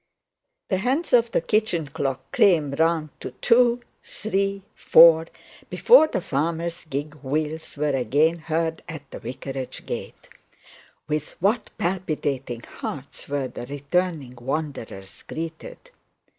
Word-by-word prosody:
The 190 - +2
hands 265 - 0
of 235 -1 +5
the 230 - +1
kitchen 200 -4 +1
clock 135 -2 -4
came 160 -8 +4
round 160 +1 +1
to - - -5
two, 240 0 +4 0.2
three, 195 -2 -2
four, 165 0 +7 0.4
before 460 -10 +6
the 190 - -2
farmer's 170 +3 -2
gig 145 +1 -4
wheels 155 +3 -3
were 145 -1 +1
agin 145 +7 +2
heard 160 0 -1
at 145 -4 -9
the - - -7
vicarage 130 0 -6
gate. - - -6 0.8
With 150 -1 -3
what 210 +5 +1
palpitating 145 -9 -2
hearts 140 0 -7
were 140 -2 -1
the 120 - -8
returning 145 0 -1
wanderers 130 -8 -5
greeted! - - -7
160 Hz, 120 wpm, -24 LUFS, 140-185 Hz, 0.8 s, four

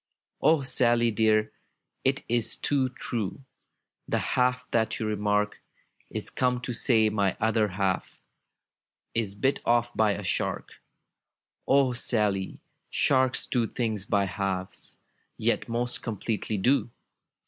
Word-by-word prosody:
"O 155 -3 +4
SaDy, 120 -3 +2
dear, 110 0 +2 0.5
it 135 +1 +1
is 120 -1 +1
too 135 -3 +1
true, 120 -1 -4 0.3
— - - -56
The - - +1
half 125 0 +1
that 110 -1 +1
you 110 - -2
remark 105 0 0 0.5
Is - - -5
come 125 -1 +1
to 125 0 -3
say 110 -2 +3
my 100 -3 0
other 110 0 +2
half 95 -1 -2 0.9
Is 105 -4 0
bit 135 +6 +1
off 120 0 +2
by 110 -2 +3
a 100 - -5
shark! 90 - -3 0.9
'^O 135 -2 +4
Sally, 105 -5 0 0.3
sharks 130 -2 +2
do 120 -3 0
things 110 -5 -2
by 100 -1 +2
halves. 95 0 -3 0.4
Yet - - 0
most 120 +1 -1
completely 110 -1 -3
do! 125 +6 +2
115 Hz, 125 wpm, -27 LUFS, 105-125 Hz, 0.9 s, O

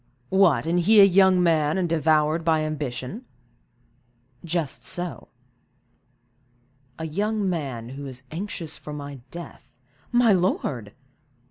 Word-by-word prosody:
"What, 175 -10 +3
and 170 +2 +1
he 210 +5 +5
a - - +10
young 190 -1 +4
man, 155 -1 +2
and 185 -2 0
devoured 155 0 +2
by 160 -1 +2
ambition?" 150 - -4 1.2
"Just 170 -4 -3
so." 175 -1 -3 1.7
"A 160 - -5
young 205 +5 -1
man 135 -10 -3
who 140 +2 -7
is 130 -1 -9
anxious 170 -2 -5
for 150 - -9
my 145 -2 -7
death—" 170 -6 -11 0.3
"My 240 -3 +4
lord!" 140 - -1
165 Hz, 120 wpm, -24 LUFS, 145-185 Hz, 1.7 s, a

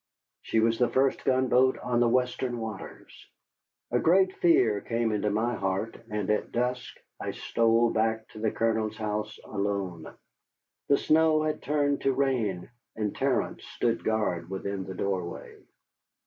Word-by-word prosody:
She 110 - 0
was 115 +1 +2
the 125 - +3
first 135 0 +1
gunboat 130 0 +3
on 120 -1 -1
the 120 -1 +4
Western 125 0 0
waters. 110 -4 -7 0.8
A 125 - +2
great 185 +5 +4
fear 115 - +3
came 115 -1 -1
into 105 0 0
my 110 +4 0
heart, 95 +2 -2
and 105 -2 -2
at 105 - -1
dusk 125 +1 -2 0.2
I - - -4
stole 115 0 +2
back 110 0 0
to 110 - -11
the 110 0 +1
Colonel's 110 -1 -1
house 105 0 -3
alone. 100 -5 -3 0.8
The 140 - +5
snow 155 0 +3
had 155 0 -2
turned 145 -1 0
to 135 - +2
rain, 120 -9 -1 0.2
and 105 -2 -2
Terence - - -1
stood 115 -1 -1
guard 95 -6 -1
within 95 0 -4
the 95 0 -7
doorway. 90 -2 -4
115 Hz, 150 wpm, -28 LUFS, 105-125 Hz, 0.8 s, The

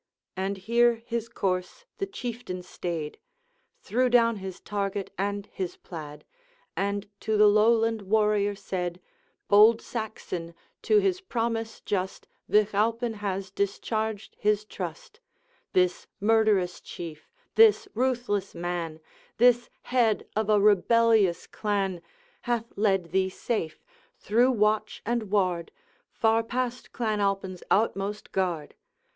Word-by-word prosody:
And 195 +1 -2
here 235 +4 +3
his 230 -1 -3
course 190 - -2
the 395 - -1
Chieftain 240 - -5
stayed, 165 -4 -5 0.6
Threw 255 - +1
down 230 -2 +4
his 190 -2 -7
target 200 -1 -3
and 200 +1 -2
his 185 -2 -4
plaid, 150 -3 -9 0.5
And 200 +1 -1
to 220 -1 0
the 210 - +7
Lowland 225 +1 +4
warrior 205 0 +2
said: 180 -2 -4 0.5
'Bold 215 +3 +7
Saxon! 185 -7 -5 0.3
to 430 - +3
his 385 -2 +2
promise 230 -8 -2
just, 190 -2 -3 0.2
Vich 210 0 +3
Alpine 230 +3 +1
has 195 -2 -4
discharged 215 +2 -2
his 210 0 +1
trust. 180 - -7 0.5
This 180 -1 +2
murderous 210 -4 +2
Chief, 160 -3 -9 0.2
this 445 -1 +6
ruthless 240 -4 -1
man, 170 -2 -3 0.4
This 245 0 +4
head 235 -4 +1
of 215 0 0
a 210 -1 +5
rebellious 210 -2 +4
clan, 195 -4 -2 0.4
Hath 235 -1 -2
led 195 -5 +1
thee 190 0 +2
safe, 185 -4 -3 0.3
through 240 +4 +3
watch 215 -2 +1
and 230 -2 -1
ward, 185 -4 0 0.4
Far 225 0 +2
past 245 +2 -3
Clan 220 -3 -1
Alpine's 195 -2 -1
outmost 205 -1 0
guard. 175 -6 -1
210 Hz, 120 wpm, -27 LUFS, 190-230 Hz, 0.6 s, the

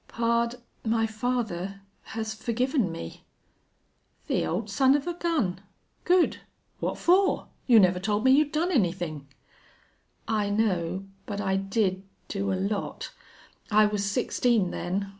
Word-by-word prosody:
"Pard, 235 0 0 0.3
my 225 0 +1
father 215 -4 -2 0.4
has 220 -1 -2
forgiven 240 - 0
me." 85 - -8 1.0
"The - - 0
old 200 +6 -2
son 265 +6 +4
of 290 - -1
a 350 - -2
gun! 295 - -1 0.4
Good! 360 -1 +3 0.4
What - - -2
for? 380 +3 +3 0.2
You 235 -4 +7
never 180 -2 +4
told 205 +2 0
me 260 - +5
you'd 290 +2 +4
done 330 +4 0
anythin'." 175 - -1 1.0
"I 215 -2 0
know 190 -3 0 0.2
but 200 -1 -4
I 190 -2 0
did 195 -1 0 0.3
do 195 -1 -1
a - - +1
lot. 200 - -3 0.6
I 215 -1 +5
was 210 -1 -1
sixteen 215 -1 +1
then. 195 +3 -2
215 Hz, 135 wpm, -27 LUFS, 195-245 Hz, 1.0 s, You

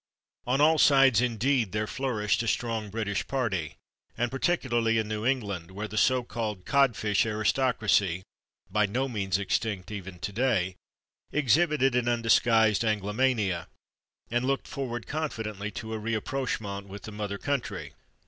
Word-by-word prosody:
On 130 +3 +2
all 155 +1 +5
sides, 135 -6 +6
indeed, 120 -2 +1
there 105 0 0
flourished 115 -4 -1
a 115 - -3
strong 110 -2 -1
British 100 -1 -2
party, 100 - -2 0.4
and 120 0 0
particularly 120 -6 +1
in 110 -1 0
New 110 +2 -2
England, 100 -10 -1
where 100 +3 -5
the 105 - -8
so 125 +3 +3
called 110 -6 -4
codfish 115 -8 +2
aristocracy 105 -4 +1 0.5
(by 105 -1 +2
no 125 +7 -1
means 95 -7 -1
extinct, 100 -1 -2
even 95 -3 -7
today) 100 -1 0 0.6
exhibited 150 -1 +3
an 125 -1 +1
undisguised 115 -2 +3
Anglomania, 105 -3 0 0.6
and 120 +1 +1
looked 135 +1 -1
forward 120 -4 -4
confidently 110 -9 -3
to 110 +1 -6
a 110 - -3
/rapprochement/ 110 -3 -3
with 100 0 -9
the 110 - -7
mother 105 -1 -4
country. 140 +3 -3
110 Hz, 140 wpm, -28 LUFS, 105-130 Hz, 0.6 s, sides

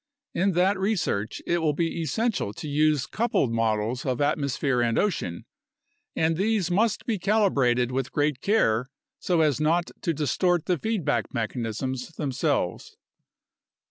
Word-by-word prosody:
In 190 +2 +1
that 185 +3 +2
research 185 - -1
it 175 - +1
will 155 -2 +1
be 165 +1 -1
essential 220 - -1
to 150 - -7
use 150 -1 +2
coupled 220 - 0
models 115 +2 0
of 130 -2 -1
atmosphere 140 -3 0
and 115 -1 +1
ocean, 150 - -1 0.7
and 160 0 +2
these 200 -2 +1
must 210 +3 +1
be 220 -5 -1
calibrated 140 - +2
with 130 0 -2
great 145 -2 0
care 130 - +2 0.3
so 175 -3 +1
as 150 -1 +2
not 170 +3 +1
to 170 - 0
distort 165 +3 +1
the 180 -4 0
feedback 215 -10 -1
mechanisms 125 +4 -3
themselves. 135 - -2
150 Hz, 140 wpm, -26 LUFS, 125-185 Hz, 0.7 s, that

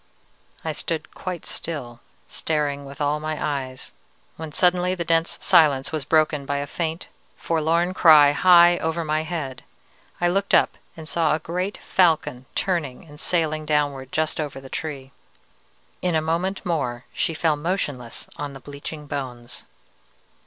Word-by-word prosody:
"I 160 - 0
stood 160 +1 -4
quite 180 -3 -6
still, 125 -8 -5 0.3
staring 145 -2 -1
with 140 0 -10
all 145 +1 +1
my 155 0 -3
eyes, 135 -3 -4 0.4
when 160 -1 -7
suddenly 180 +2 +2
the 170 -2 -3
dense 165 0 +1
silence 150 -7 +4
was 155 -4 -3
broken 155 -2 +2
by 140 +1 -2
a 140 - -2
faint, 160 +2 -3 0.3
forlorn 165 +2 +1
cry 155 -5 +7
high 175 +2 +6
over 160 +1 -1
my 155 0 +1
head. 155 -6 -5 0.6
I 175 - +2
looked 195 +3 +2
up - - +3 0.2
and 160 -1 -9
saw 160 -2 +2
a - - -3
great 180 +5 -3
falcon 155 -8 +1
turning 170 -9 -1
and 150 -2 -14
sailing 155 -3 0
downward 145 -3 0
just 155 0 0
over 145 -3 -5
the 135 0 -12
tree. 135 -4 -5 0.9
In 180 -2 +1
a - - +4
moment 170 +6 -1
more 130 -8 -2
she 165 - -1
fell 160 -1 +2
motionless 145 -7 -3
on 145 -1 -5
the 135 - -9
bleaching 145 +3 -8
bones. 125 -4 -6
155 Hz, 150 wpm, -23 LUFS, 140-170 Hz, 0.9 s, cry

